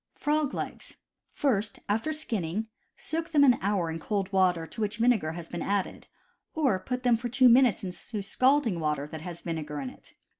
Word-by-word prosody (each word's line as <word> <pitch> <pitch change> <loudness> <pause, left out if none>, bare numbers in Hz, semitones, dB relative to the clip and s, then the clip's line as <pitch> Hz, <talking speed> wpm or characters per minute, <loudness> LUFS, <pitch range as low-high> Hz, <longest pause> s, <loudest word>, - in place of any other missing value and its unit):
Frog 300 -1 0
Legs. - - -6 0.2
— - - -51
First 220 -7 0
after 220 +9 0
skinning, 220 - -2 0.3
soak 330 +1 -4
them 300 -3 +4
an 250 -4 +5
hour 190 -4 0
in 165 - -4
cold 195 +2 -2
water 180 -3 +3
to 220 - -8
which 210 0 -1
vinegar 230 -9 +2
has 170 -1 -7
been 175 - -5
added, 200 -1 -2 0.5
or 270 -12 +2
put 250 +6 -4
them 245 -2 +4
for 240 +2 -4
two 255 +1 +5
minutes 245 -3 +5
into 195 +3 -5
scalding 255 -3 +2
water 150 -2 -1
that 155 +1 -8
has 170 0 -8
vinegar 155 -3 -4
in 135 -2 -5
it. - - -18
205 Hz, 190 wpm, -28 LUFS, 170-250 Hz, 0.5 s, an